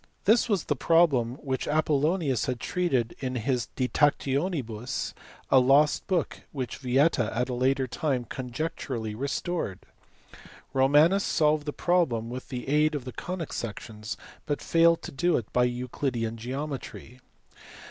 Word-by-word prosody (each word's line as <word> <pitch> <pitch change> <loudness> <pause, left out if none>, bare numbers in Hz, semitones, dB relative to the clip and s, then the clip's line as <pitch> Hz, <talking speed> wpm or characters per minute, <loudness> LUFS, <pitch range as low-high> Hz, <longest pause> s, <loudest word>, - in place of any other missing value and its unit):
This 225 +3 +4
was 200 -6 +1
the 145 - -1
problem 140 -6 +3
which 130 -2 -2
Apollonius 150 - +1
had 125 -2 -2
treated 135 -11 0
in 130 -1 -3
his 125 0 -1
De 130 - 0
TactionibuSy 135 - 0 0.4
a 135 - +8
lost 140 +4 +4
book 180 -4 -1
which 130 -4 -4
Vieta 130 -2 +2
at 125 +2 0
a - - -2
later 130 +2 +1
time 130 -1 -1
conjecturally 125 -3 -4
restored. 140 - -2 1.0
Romanus 145 +9 +4
solved 150 -1 +2
the - - 0
problem 135 -11 +1
with 130 +1 -7
the 125 -1 -5
aid 150 +2 +3
of 135 -4 -4
the 125 - -6
conic 180 -3 -5
sections, 110 0 -6 0.3
but 145 - -1
failed 165 0 +3
to - - -6
do 175 +5 +2
it 115 - -6
by 125 0 +4
Euclidean 120 -1 -2
geometry. 130 0 -6
135 Hz, 140 wpm, -27 LUFS, 125-155 Hz, 1.0 s, a